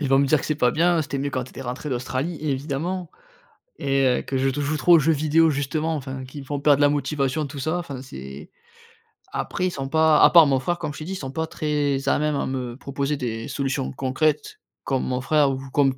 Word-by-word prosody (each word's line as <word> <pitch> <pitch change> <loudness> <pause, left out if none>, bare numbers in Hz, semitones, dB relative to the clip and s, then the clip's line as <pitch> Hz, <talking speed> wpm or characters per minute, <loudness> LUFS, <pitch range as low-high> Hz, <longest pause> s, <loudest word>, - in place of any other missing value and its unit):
ils 145 - -1
vont 135 0 +4
me 140 - +3
dire 150 +1 +3
que: - - -5
«C'est 155 - 0
pas 125 -4 +2
bien, 170 +3 +2
c'était 140 -2 -4
mieux 140 +1 -2
quand 130 -1 -2
tu 130 - -13
étais - - -10
rentré 125 +4 -5
d'Australie», 130 +6 -2
évidemment 155 +5 -3 0.7
et 135 0 +1
heu, 125 - +2
que 135 - -4
je 135 +1 +2
te 140 +2 -3
joue 145 +2 -1
trop 175 +3 +3
aux - - +6
jeux 160 +2 +3
vidéos 155 +2 +3
justement, 150 +3 -1
enfin, 135 -2 -6
qui 135 +3 -9
me - - -10
font 145 +1 -4
perdre 145 -1 +4
la 145 - +5
motivation 145 0 -1
tout 140 +1 -8
ça, 155 +6 -1
enfin 140 -7 -6
c'est 70 - -10 0.8
après 185 - -2
ils - - -2
sont 135 -4 -5
pas 160 +1 +4
à - - +8
part 170 -2 +8
mon 135 -2 +2
frère 175 +7 -1
comme 150 -4 -4
je - - -9
t'ai - - -6
dit, 190 - -4
ils - - -3
sont 135 -7 -6
pas 160 +3 -2
très 145 -3 -1
à - - +3
même 150 0 0
à - - -1
me 125 -2 -4
proposer 140 +1 -2
des 115 -4 -4
solutions 135 - -2
concrètes 145 - -1 0.2
comme 135 -2 -1
mon 125 -1 -1
frère 150 +1 +3
ou 130 - -3
comme 135 -1 +2
140 Hz, 250 wpm, -23 LUFS, 130-155 Hz, 0.8 s, à